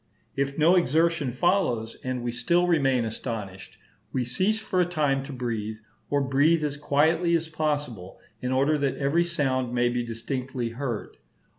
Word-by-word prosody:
If 140 0 -1
no 165 +4 +5
exertion 165 -3 +2
follows, 125 - +1
and 130 -1 -3
we 120 - -1
still 170 +10 +2
remain 135 -8 +2
astonished, 105 -4 -6 0.3
we 125 -2 -1
cease 190 - 0
for 185 -4 0
a - - +3
time 150 -6 +1
to 145 - -7
breathe, 115 -4 -3 0.3
or 145 0 +2
breathe 145 +4 +3
as 145 -1 -1
quietly 160 +4 +2
as 165 -1 -1
possible, 145 - -3 0.2
in 125 - -2
order 140 +4 +2
that 140 -1 0
every 145 +5 +2
sound 130 -7 -1
may 120 0 +3
be 120 0 -1
distinctly 125 +1 -4
heard. 120 -2 -5
135 Hz, 160 wpm, -26 LUFS, 120-160 Hz, 0.3 s, no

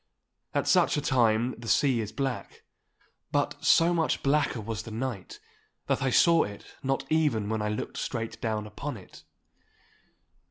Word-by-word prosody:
At - - +1
such - - +4
a - - +2
time 120 -3 +2
the 115 - -9
sea 125 0 +3
is 110 -1 -5
black. 135 -1 -4 0.7
But - - -1
so 170 +1 +5
much 165 -2 0
blacker 140 -3 +1
was 110 -2 -4
the - - -9
night 115 -3 -5 0.5
that - - 0
I 135 - +1
saw 165 +5 +5
it 100 0 -5 0.2
not 135 0 -1
even 145 -10 +1
when 110 -1 -1
I 105 - -1
looked 105 - -4
straight 115 -2 -4
down 110 -2 -2
upon 105 - -6
it. - - -15
120 Hz, 160 wpm, -28 LUFS, 110-140 Hz, 0.7 s, so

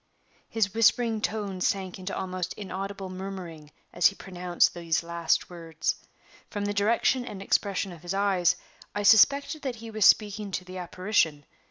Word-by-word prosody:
His 210 -4 0
whispering 225 0 +3
tones 200 -4 -1
sank 190 -2 -3
into 185 +2 -5
almost 185 -1 -3
inaudible 195 0 -5
murmuring 185 -5 -7 0.2
as 175 - +5
he 200 - -2
pronounced 180 -2 0
these 170 -1 -1
last 170 0 0
words. 165 -2 -3 0.6
From 205 -2 -3
the 205 - -1
direction 230 +5 +2
and 210 -5 -7
expression 195 -1 0
of 170 -3 -11
his 175 +2 -4
eyes, 195 -3 +2 0.4
I 205 - -1
suspected 280 +9 +5
that 260 -4 -3
he 230 0 -9
was 215 -1 0
speaking 210 -1 +3
to 180 - -3
the 185 0 -7
apparition. 175 -4 0
195 Hz, 160 wpm, -27 LUFS, 180-210 Hz, 0.6 s, as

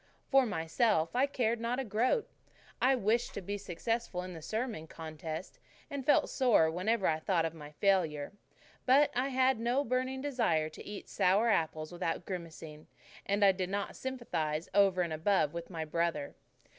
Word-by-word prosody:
For 270 -2 +5
myself, 165 0 +1
I 265 +3 +3
cared 235 -4 0
not 235 +2 -1
a - - -1
groat. 240 - +1 0.5
I 255 - +4
had 260 -5 +2
wished 230 +4 +1
to - - -2
be 200 +2 -4
successful 200 0 -3
in 185 0 -7
the 165 - -8
sermon 220 -4 -3
contest, 160 +1 -7 0.3
and 280 -1 -3
felt 295 - +5
sore 230 - +4
whenever 190 +4 0
I 155 -1 +2
thought 165 0 +1
of 165 - -3
my 150 -3 -10
failure. 160 -6 +1 0.6
But 280 +3 +5
I 255 +2 +1
had 260 -2 +2
no 245 +4 +1
burning 255 +1 -1
desire 230 - 0
to 155 - -11
eat 205 -1 -8
sour 200 +6 +3
apples 155 -5 0
without 175 -1 -3
grimacing, 165 -4 -7 0.4
and 200 +1 +3
I 195 - +7
did 185 -1 -3
not 200 +1 -3
sympathize 170 -12 -3
over 195 -2 +4
and 170 -2 -3
above 160 -1 +1
with 170 0 -6
my 165 -3 -4
brother. 160 -2 -1
195 Hz, 175 wpm, -32 LUFS, 160-240 Hz, 0.6 s, I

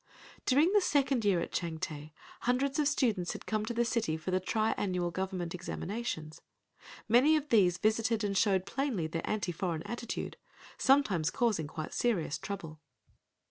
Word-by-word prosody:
During 300 +8 +4
the 415 - +5
second 275 -7 +2
year 195 -4 +3
at - - -4
Changte 160 -3 -4 0.3
hundreds 265 +4 0
of 295 - +3
students 215 -11 +1
had - - -9
come 215 0 -1
to 235 - -2
the 235 +1 +2
city 225 -9 0
for 160 +4 -4
the 185 - +2
tri 215 +4 0
annual 180 -3 -1
government 185 -2 -3
examinations. 175 -3 -5 0.7
Many 255 +8 +5
of 300 -1 -1
these 185 -7 +4
visited 220 +1 +1
and 200 -1 -1
showed 190 -2 +3
plainly 255 - -1
their 165 +1 -4
anti 205 -4 -1
foreign 170 -2 -3
attitude—sometimes 235 - -1
causing 210 -10 0
quite 155 +1 -6
serious 200 -12 0
trouble. 165 -6 -6
205 Hz, 155 wpm, -31 LUFS, 175-240 Hz, 0.7 s, the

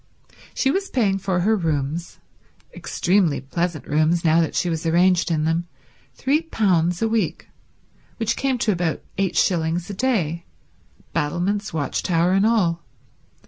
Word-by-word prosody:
She 270 - +2
was 390 +4 -2
paying 200 -6 +1
for 190 -2 -1
her 220 +5 +3
rooms—extremely 165 +2 -2
pleasant 170 +4 -3
rooms, 155 +3 +1
now 160 +1 +4
that 160 - -2
she 180 - +1
was 165 -2 -2
arranged 175 +2 +3
in 155 -2 0
them—£3 180 - -1
a - - +3
week, 210 -8 -2 0.7
which 230 0 0
came 270 -2 0
to 225 -2 +1
about 170 -4 -2 0.2
eight 185 -4 0
shillings 170 0 +1
a - - -5
day, 185 - -1 0.7
battlements, 180 +7 -1
watch 150 -3 -2
tower 175 0 +1
and 195 +3 +3
all. 175 -8 +1
175 Hz, 135 wpm, -22 LUFS, 165-205 Hz, 0.7 s, now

